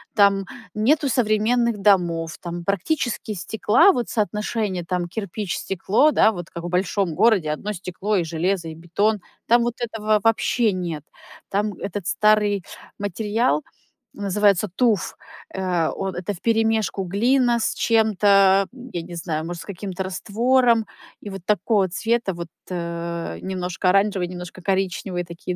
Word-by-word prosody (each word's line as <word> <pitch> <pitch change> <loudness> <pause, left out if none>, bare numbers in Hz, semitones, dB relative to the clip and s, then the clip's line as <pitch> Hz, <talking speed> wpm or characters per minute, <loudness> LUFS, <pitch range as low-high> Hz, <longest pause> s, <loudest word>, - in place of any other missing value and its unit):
Там 200 -2 +4 0.3
нету 280 +8 +2
современных 235 0 +2
домов, 170 -5 +2
там 175 0 -5
практически 220 - -1
стекла, 220 - +4
вот 245 - -2
соотношение 210 -3 -1
там 180 0 -2
кирпич, 200 -1 -4
стекло, 205 - +2
да, 220 - +4
вот 175 -4 -7
как 170 - -8
в 175 - -4
большом 180 0 0
городе 200 -10 +3
одно 200 +8 -3
стекло 190 +2 -3
и 175 - +1
железо, 170 +2 -1
и 160 - -8
бетон, 190 +5 0 0.3
там 235 +1 +5
вот 240 0 -1
этого 215 -2 0
вообще 225 0 +2
нет. 170 -5 -4 0.5
Там 205 +1 0
этот 200 -2 -5
старый 210 -3 +3 0.4
материал 215 - 0 0.5
называется 205 0 +2
туф. 225 -6 +1 0.4
Э, 180 -4 0
он. 195 -2 -3
Это 180 +3 -3
вперемешку 220 0 0
глина 235 +6 +2
с - - -1
чем-то, 200 -3 +4
м, 255 0 -11
я 175 - -2
не 170 +1 -9
знаю, 160 -2 -3
может, 175 0 -5
с - - -16
каким-то 190 -1 -5
раствором, 230 +5 +2 0.4
и 205 - -7
вот 195 -1 -7
такого 205 -1 +2
цвета 225 +1 0
вот, 170 -1 -7 0.2
э, 170 -1 -4
немножко 185 -1 -3
оранжевые, 195 -2 +2
немножко 180 0 -8
коричневые 190 -1 -1
такие 170 +1 -6
200 Hz, 145 wpm, -22 LUFS, 175-220 Hz, 0.5 s, там